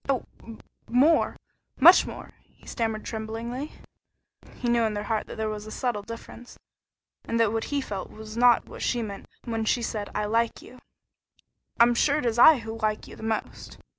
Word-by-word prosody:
"Oh, 265 -3 0 0.6
more! 280 +7 +3 0.4
Much - - +8
more!" - - -9 0.2
he - - -24
stammered 225 -2 -3
tremblingly. 230 +5 -5 0.8
He 245 - -4
knew 235 0 +3
in 220 -2 0
his 205 0 -3
heart 220 -2 -1
that - - -8
there 220 0 -1
was 215 0 -5
a - - -8
subtle 240 -5 -2
difference, 230 +2 -10 0.7
and 230 - -1
that 225 -2 +3
what 225 - -1
he 285 -1 -1
felt 200 -7 -5
was 215 0 -10
not 240 0 +5
what - - -11
she 240 -2 0
meant 200 -2 -7 0.2
when 225 -2 -2
she 235 +2 +1
said, 210 -2 -3
"I 210 - 0
like 230 +2 0
you." 250 - -14 1.0
"I'm 235 +1 +6
sure 285 +4 +2
it 300 - -2
is 235 0 0
I 310 +4 +9
who 225 0 -7
like 215 -1 -1
you - - -11
the - - -13
most." 220 0 -4
225 Hz, 190 wpm, -26 LUFS, 215-240 Hz, 1.0 s, I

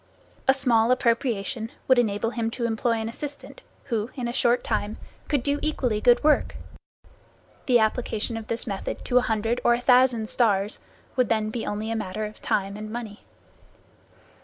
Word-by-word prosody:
A 265 - +7
small 235 -4 +3
appropriation 230 -3 0 0.2
would 260 -2 +5
enable 225 0 0
him 230 -2 -1
to 240 - -1
employ 230 +1 0
an 225 -1 -2
assistant 285 +5 -7 0.2
who, 230 -3 -2
in 250 -3 -3
a 235 - -3
short 240 0 +2
time, 210 +2 -2 0.3
could 285 -5 0
do 285 +1 0
equally 250 -8 0
good 245 +4 +5
work. 305 0 +3 1.1
The 250 -2 +6
application 225 0 0
of 225 -1 -6
this 230 0 -3
method 195 -3 -5
to 250 - +4
a 250 - -2
hundred 225 +2 0
or 240 - +5
a - - -3
thousand 245 -3 +4
stars 210 -4 +1 0.4
would 250 -4 +2
then 215 -1 +1
be 230 0 -4
only 215 +2 -3
a - - -1
matter 215 0 -3
of 210 0 -10
time 200 +1 -1
and 215 0 -7
money. 225 -3 -6
230 Hz, 175 wpm, -25 LUFS, 215-245 Hz, 1.1 s, A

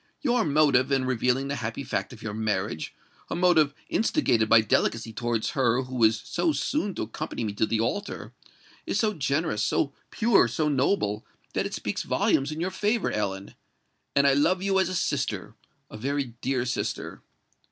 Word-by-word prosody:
Your 245 -4 +2
motive 140 -4 +3
in 135 -1 +2
revealing 130 +1 +1
the 140 0 -2
happy 115 +3 -4
fact - - -3
of 115 -3 -12
your 110 -2 -4
marriage—a 105 - -4
motive 165 -5 +3
instigated 120 - +1
by 110 0 +7
delicacy 115 +1 0
towards 115 0 -1
her 130 -1 +2
who 125 -2 -2
is 110 0 +4
so 325 - 0
soon 210 - -1
to - - -2
accompany 110 +2 -5
me 105 -2 -2
to 110 +1 +1
the 110 - 0
altar—is 160 - -5
so 215 -2 +2
generous, 140 - -1
so 140 +5 +1 0.2
pure, 225 - +4
so 150 +6 -1
noble, 130 - +1 0.3
that - - 0
it - - -6
speaks - - -3
volumes 135 +2 +1
in 155 - -5
your 180 +3 -1
favour, 210 +4 0
Ellen; 100 -2 -3 0.6
and 140 - +4
I 140 - +5
love 170 +7 +2
you 195 -1 +2
as 190 -2 +2
a 185 - -3
sister—a 110 - -4
very 135 +1 -2
dear 130 -2 0
sister." 125 - -3
135 Hz, 170 wpm, -26 LUFS, 115-165 Hz, 0.6 s, by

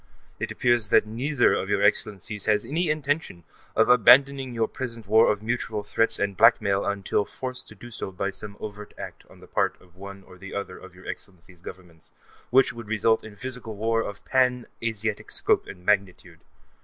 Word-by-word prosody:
It - - -3
appears 120 -3 +1
that - - +5
neither 120 +5 +1
of - - -2
your - - +1
Excellencies 105 0 +1
has 105 -1 +2
any 165 +3 -1
intention 145 - -2 0.3
of 110 - +4
abandoning 130 +3 +5
your 115 -2 0
present 115 -4 -6
war 110 +3 +5
of 105 0 -4
mutual 110 -2 -2
threats 115 +2 0
and 100 -1 -1
blackmail 105 -3 +4
until 100 0 0
forced 130 +4 -7
to - - -13
do 120 - -12
so 100 - -6
by 100 +1 -3
some 105 0 -9
overt 105 0 -8
act - - -9
on - - -17
the - - -14
part - - 0
of 90 -1 -23
one 100 +1 -10
or 90 -1 -16
the 95 +1 -9
other 100 -2 -5
of 95 -1 -14
your 90 - -15
Excellencies' 90 -2 -9
Governments, 90 -3 -12 0.4
which 130 +1 +4
would 115 -2 -9
result 110 +1 +2
in 110 -2 -11
physical 125 -2 -6
war 115 +2 +1
of 100 -2 -7
pan 125 -2 +2 0.2
Asiatic 110 -2 -3
scope - - +1
and 90 -1 -11
magnitude. 95 -4 0
110 Hz, 190 wpm, -25 LUFS, 100-120 Hz, 0.4 s, that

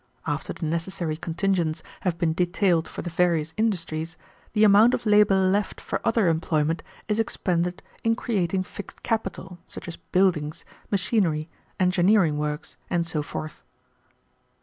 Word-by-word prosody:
After - - -2
the 165 - -5
necessary 165 0 -2
contingents 170 0 -1 0.2
have 180 -3 -1
been 170 -2 +1
detailed 175 -1 +2
for - - -7
the 175 - -4
various 165 -2 +1
industries, 175 -6 -1 0.4
the 215 -1 +4
amount 215 +3 +7
of - - -6
labor 210 -2 +5
left 190 +2 +1
for - - -3
other 225 -4 +3
employment 160 -1 +1 0.3
is 210 +1 0
expended 180 -5 -1 0.2
in 225 0 +3
creating 190 -6 0
fixed 205 - -10
capital, 195 -5 -3
such - - -8
as 170 - -6
buildings, 165 -5 0 0.2
machinery, 185 -6 +1 0.3
engineering 180 -3 +3
works, 150 +1 -4
and 170 -1 +1
so 160 -2 -2
forth." 155 +1 -6
180 Hz, 140 wpm, -25 LUFS, 165-195 Hz, 0.4 s, amount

